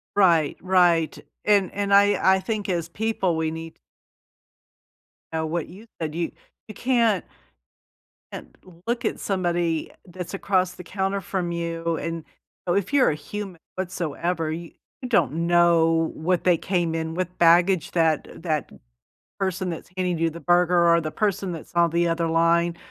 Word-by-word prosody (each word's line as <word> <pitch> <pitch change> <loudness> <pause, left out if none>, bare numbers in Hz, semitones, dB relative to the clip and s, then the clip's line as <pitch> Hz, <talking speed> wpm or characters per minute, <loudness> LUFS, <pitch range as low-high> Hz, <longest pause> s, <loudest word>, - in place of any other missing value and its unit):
Right, 170 -7 +3
right. 175 -3 +3 0.3
And 200 -3 +3
and 200 0 -1
I 200 -1 +5
I - - 0
think 205 +1 -3
as 170 -2 -1
people, 195 -3 -1
we 160 -1 -1
need 160 0 -7 1.6
Know 160 0 -1
what 160 0 -2
you 210 +6 -13 0.2
do 155 - -8
you 170 - -1 0.4
you 215 - -8
can't 230 -6 +2 1.1
can't - - -9 0.3
look 235 0 -1
at - - -1
somebody 175 -4 -1 0.2
that's 180 0 -7
across 185 -2 0
the 180 - -10
counter 195 +2 -2
from 180 -2 -3
you, 170 -1 -2
and 165 0 -4 0.4
know 175 - +2
if 200 +3 0
you're 275 -3 +5
a - - -2
human 185 +4 -7 0.2
whatsoever, 170 -2 -2
you 165 +1 -6 0.4
don't 175 - +2
know 165 -1 +3
what 175 +2 0
they 180 -2 +4
came 175 -2 -1
in 160 0 -3
with, 180 +1 -3
baggage 175 +1 +4
that 160 -3 +1
that 155 -4 -2 0.7
person 190 -1 -1
that's 165 - -8
handing 180 -2 0
you 165 0 +2
the 170 - -9
burger 175 +1 +3
or 170 - +3
the 155 - -3
person 200 -3 -1
that's 165 0 -9
on 170 0 +3
the 170 +1 +1
other 165 0 0
line, 170 +1 +2
175 Hz, 155 wpm, -24 LUFS, 165-190 Hz, 1.6 s, I